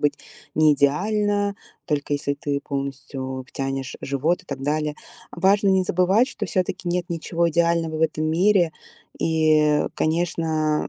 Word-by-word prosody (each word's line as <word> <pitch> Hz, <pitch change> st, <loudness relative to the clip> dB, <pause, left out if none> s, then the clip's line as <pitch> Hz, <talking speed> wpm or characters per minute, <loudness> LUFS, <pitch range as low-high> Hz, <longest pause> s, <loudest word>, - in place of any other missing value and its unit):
быть 145 Hz, -1 st, +2 dB, 0.4 s
неидеально, 200 Hz, +8 st, +2 dB, 0.3 s
только 145 Hz, -2 st, -1 dB
если 140 Hz, 0 st, -1 dB
ты 140 Hz, 0 st, -3 dB
полностью 135 Hz, -2 st, -5 dB
втянешь 135 Hz, -1 st, -4 dB
живот 145 Hz, +6 st, 0 dB
и -, -, -29 dB
так 135 Hz, -1 st, -6 dB
далее. 150 Hz, +1 st, -1 dB, 0.4 s
А -, -, -11 dB
важно 200 Hz, +2 st, +4 dB
не 190 Hz, -1 st, +4 dB
забывать, 185 Hz, +7 st, +3 dB
что 210 Hz, -6 st, -5 dB
всё-таки 185 Hz, 0 st, -2 dB
нет 175 Hz, 0 st, -2 dB
ничего 170 Hz, 0 st, 0 dB
идеального 170 Hz, -1 st, +1 dB
в -, -, -4 dB
этом 155 Hz, -1 st, +1 dB
мире. 175 Hz, +1 st, +3 dB, 0.5 s
И, 160 Hz, -1 st, +2 dB
э, 150 Hz, -1 st, +2 dB
конечно, 160 Hz, -2 st, 0 dB
160 Hz, 145 wpm, -23 LUFS, 145-180 Hz, 0.5 s, важно